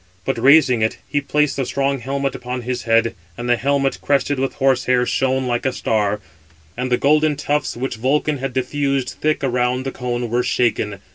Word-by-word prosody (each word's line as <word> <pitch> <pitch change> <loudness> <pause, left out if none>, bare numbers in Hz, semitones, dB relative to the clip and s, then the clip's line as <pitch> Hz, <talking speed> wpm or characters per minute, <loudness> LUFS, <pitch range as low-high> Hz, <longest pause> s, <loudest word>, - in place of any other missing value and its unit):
But - - -1
raising 130 -2 +5
it, 110 - 0
he 145 - 0
placed 150 0 0
the 135 - 0
strong 140 0 0
helmet 135 +2 -2
upon 125 0 -5
his 125 +1 -3
head; 115 0 +3 0.2
and 120 - -5
the 120 - +4
helmet, 135 +2 0
crested 145 -1 +1
with 135 0 -1
horse 135 -2 +2
hair, 125 -1 +2
shone 130 +1 0
like 120 -1 -1
a 130 - +1
star; 105 -3 0 0.6
and 125 +1 -3
the 125 - +4
golden 150 +3 +3
tufts 145 -2 -1
which 125 -1 -3
Vulcan 145 +4 0
had 135 0 -3
diffused 135 +1 -1
thick 155 -1 0
around 125 0 0
the 135 - -2
cone 120 -2 -3
were 120 +1 +2
shaken. 105 -5 0
130 Hz, 195 wpm, -20 LUFS, 120-140 Hz, 0.6 s, raising